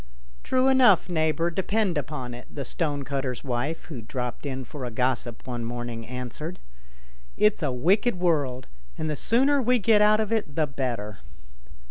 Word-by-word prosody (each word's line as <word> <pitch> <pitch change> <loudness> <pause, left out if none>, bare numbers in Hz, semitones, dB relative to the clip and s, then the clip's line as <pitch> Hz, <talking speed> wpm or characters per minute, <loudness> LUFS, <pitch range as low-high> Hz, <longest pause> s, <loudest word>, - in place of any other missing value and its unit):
"True 255 0 +2
enough, 250 -10 +5
neighbour, 165 0 +1
depend 195 +1 0
upon 140 -4 -4
it," 120 +1 -10
the 140 -2 -6
stonecutter's 140 -4 -2
wife, 135 +5 -2
who 135 -8 -7
dropped 125 +4 -4
in 130 -1 -3
for 135 +3 -8
a 125 - -2
gossip 120 0 -1
one 120 -2 -4
morning, 120 -1 -5
answered; 125 +7 -5 0.4
" - - -24 0.3
it's 210 -2 +3
a 145 -4 0
wicked 190 - +2
world, 145 -8 0 0.3
and 155 -1 -2
the - - -1
sooner 270 - +3
we 250 +1 +3
get 215 -1 +4
out 210 +1 +5
of 220 0 -1
it 210 -11 -1
the 155 - +2
better." 120 -8 -4
145 Hz, 165 wpm, -26 LUFS, 125-190 Hz, 0.4 s, enough